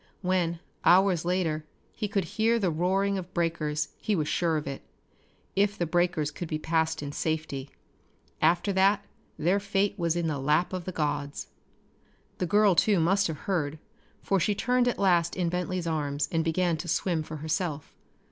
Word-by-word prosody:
When, 175 -2 0 0.2
hours 185 -2 +4
later, 170 -4 0 0.3
he 215 - -3
could 195 -1 0
hear 225 +6 +1
the 190 -6 +1
roaring 190 +4 +1
of 180 0 -9
breakers 155 -3 -1
he 215 - 0
was 155 -4 0
sure 165 -1 +1
of 150 - -4
it 140 0 -5 0.7
if 205 +1 +2
the 175 - 0
breakers 170 -2 +1
could 170 +3 -6
be 155 - -2
passed 160 0 0
in 145 - -4
safety. 155 -3 -3 0.7
After 175 +5 +3
that 200 +2 +3 0.3
their 180 +6 +2
fate 200 0 0
was 170 -1 +1
in 170 -1 0
the 150 -3 -1
lap 150 +7 +1
of 180 -2 -4
the 185 - -3
gods. 145 -3 -3 0.9
The 180 - 0
girl 205 +1 +5
too 190 +3 +3
must 195 +5 +3
have 155 -3 -5
heard, 160 -6 -1 0.5
for 195 - +2
she 205 +4 +1
turned 250 +3 +2
at 245 - 0
last 175 -4 +2
in 180 -2 0
Bentley's 180 0 -2
arms 145 -3 -1
and 165 -1 +1
began 165 +1 +1
to 170 - -6
swim 170 0 0
for 155 0 -7
herself. 155 0 -3
170 Hz, 175 wpm, -28 LUFS, 155-190 Hz, 0.9 s, girl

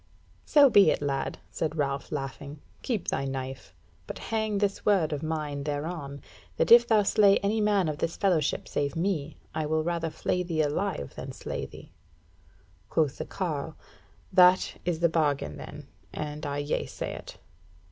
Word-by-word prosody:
"So 290 -2 +7
be 200 -8 +6
it, - - +1
lad," 140 -2 -2
said 160 -1 -2
Ralph, 140 -2 -2
laughing, 140 +1 -5 0.2
"keep 225 -9 -2
thy 135 - -1
knife; 130 -9 -5 0.4
but - - -6
hang 220 -2 -1
this 200 0 -1
word 185 -7 +2
of 145 - -3
mine 150 -3 -3
thereon, 145 -1 -4 0.3
that - - +1
if 235 0 +9
thou 220 -3 +4
slay 200 0 +5
any 215 +2 +1
man 205 -4 +2
of 150 -1 -3
this 165 - -2
fellowship 175 -7 +1
save 145 +2 -2
me, 165 -4 -2 0.2
I 155 -1 -2
will 155 +1 +1
rather 170 -1 -1
flay 180 +3 -1
thee 165 -3 0
alive 150 - -2
than - - -7
slay - - -5
thee." - - -13 1.0
Quoth 150 -4 0
the - - -3
carle: 160 -4 -3 0.6
"That 180 0 +6
is 170 -2 -1
the 170 - +5
bargain, 145 - 0
then, - - -9 0.3
and 150 0 -5
I 145 0 -2
yeasay 145 - -3
it." - - -11
160 Hz, 165 wpm, -28 LUFS, 145-190 Hz, 1.0 s, if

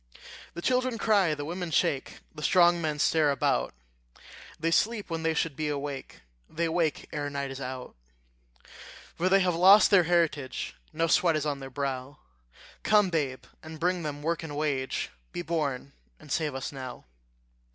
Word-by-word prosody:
The 170 - -6
children 255 -1 +1
cry, 200 -9 +3
the 145 -1 -5
women 175 +2 -4
shake, 140 -3 0
The 150 - -9
strong 175 +1 +4
men 155 -2 -1
stare 155 0 +3
about; 140 - +1 0.9
They 165 +1 0
sleep 210 +1 +1
when 165 0 -2
they 160 0 0
should 160 -4 -1
be 155 +2 -2
awake, 140 -1 -5 0.3
They 165 +2 -1
wake 160 -2 0
ere 145 -1 -2
night 140 -1 -4
is 135 0 -7
out. 130 0 -6 1.2
For 180 +2 0
they 195 +1 +5
have 180 -1 +2
lost 190 +6 +7
their 185 -4 +6
heritage 160 -6 0 0.2
No 165 +1 0
sweat 165 0 +3
is 155 -1 -1
on 145 -2 -2
their 135 -1 -8
brow: 135 0 -4 0.6
Come, 210 -3 +3
babe, 140 -6 -1 0.2
and 160 0 -10
bring 180 +1 0
them 145 -2 -5
work 165 +2 -1
and 150 -3 -6
wage; 140 -3 -1 0.2
Be 175 - -4
born, 140 -5 -2 0.3
and 150 -2 -13
save 150 -4 -1
us 135 - -4
now. 130 -3 -8
155 Hz, 170 wpm, -28 LUFS, 140-175 Hz, 1.2 s, lost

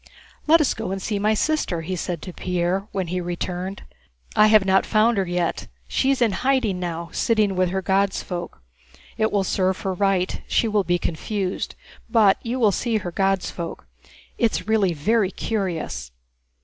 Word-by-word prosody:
"Let 325 +1 +6
us 290 - +2
go 220 -3 -5
and 195 +1 -2
see 205 +1 -2
my 215 +2 +2
sister," 260 - 0
he 185 +3 -3
said 175 -2 -4
to 185 - -7
Pierre 180 +3 -1
when 190 -4 -2
he 180 +1 -1
returned. 180 +2 -4 0.5
"I 215 - +6
have 215 -2 +5
not 190 0 +4
found 215 0 +3
her 190 - 0
yet, 175 -1 -1 0.2
she 260 - +1
is 275 -2 +1
hiding 230 -2 +1
now, 170 -1 -4
sitting 215 -4 +1
with 185 -1 +2
her 190 +1 -2
'God's 195 +1 +1
folk.' 175 - -6 0.6
It 220 0 +2
will 200 -1 +2
serve 185 0 0
her 190 - -1
right, 190 -1 0
she 230 - +2
will 210 -2 +2
be 175 -1 +1
confused, 185 +3 -3 0.3
but 215 -5 +4
you 245 +2 -2
will 215 -4 +4
see 230 +3 0
her 185 -4 -4
'God's 195 +1 0
folk.' 170 - -6 0.5
It's 225 -4 0
really 210 -5 +2
very 195 +7 +1
curious." 170 - -3
195 Hz, 175 wpm, -23 LUFS, 180-215 Hz, 0.6 s, Let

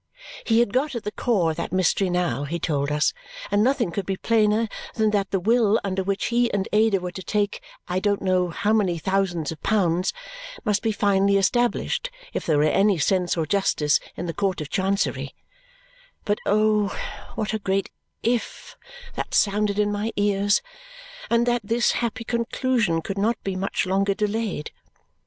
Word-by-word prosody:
He 225 0 +4
had 235 -3 0
got 270 +2 0
at 235 - -4
the 210 - -3
core 195 -10 +1
of 160 - -7
that 170 - -4
mystery 185 +1 +2
now, 180 -5 0
he 165 +4 -3
told 145 -3 -1
us, 150 0 +2 0.4
and 205 +1 +3
nothing 245 -6 +1
could 190 +1 -4
be 195 -1 -1
plainer 220 0 +2 0.3
than 220 -1 +2
that 200 -2 0
the 195 - 0
will 225 +2 +3
under 190 -1 -1
which 195 +1 -1
he 240 0 +3
and 200 -1 -1
Ada 215 -2 +4
were 180 0 -5
to 190 - -7
take 205 +1 -1 0.3
I 180 0 0
don't 205 0 +1
know 185 -1 +2
how 205 +5 0
many 195 -6 +2
thousands 180 -2 -1
of 160 - -9
pounds 185 -4 +1 0.5
must 210 -2 +1
be 225 - +1
finally 200 -1 +2
established 240 - +1 0.2
if - - -4
there 155 -3 +3
were 145 - +3
any 195 +5 +3
sense 180 +3 +1
or 160 - 0
justice 155 -5 +2 0.2
in 175 - -4
the 165 - -3
Court 195 -1 -1
of 150 -2 -6
Chancery 195 +1 -1 0.9
but 205 0 0
oh, 215 0 +3 0.5
what 215 0 -2
a 220 - -1
great 195 -1 -1 0.3
IF 235 0 -2 0.4
that - - -4
sounded 205 0 +2
in 210 0 +2
my 205 +2 -2
ears 205 - +2 0.7
and 235 0 +3
that 240 0 +1
this 230 +3 +2
happy 230 -1 -2
conclusion 235 -6 0
could 195 +3 -4
not 225 +3 +1
be 195 -1 -2
much 190 0 -1
longer 195 +1 +1
delayed. 210 -6 -2
200 Hz, 180 wpm, -24 LUFS, 185-220 Hz, 0.9 s, He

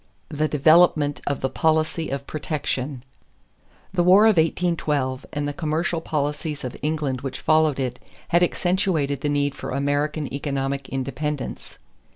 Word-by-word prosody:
The 155 0 0
Development 155 0 +4
of 140 - -1
the 135 - 0
Policy 160 +1 +2
of 140 0 -4
"Protection." 140 -4 -3 0.9
The 180 - +2
war 185 +5 +6
of 220 -4 +5
1812 155 -5 0
and 145 -1 -2
the 145 - -3
commercial 160 +1 -1
policies 150 -1 -2
of 125 - -5
England 150 -4 -1
which 135 -2 -5
followed 155 -3 +3
it 125 -2 -2 0.3
had 175 - +4
accentuated 175 -5 +1
the 145 - 0
need 145 -1 +1
for - - -7
American 145 +2 -1
economic 140 -1 -2
independence. 135 +2 -4
150 Hz, 140 wpm, -23 LUFS, 140-160 Hz, 0.9 s, war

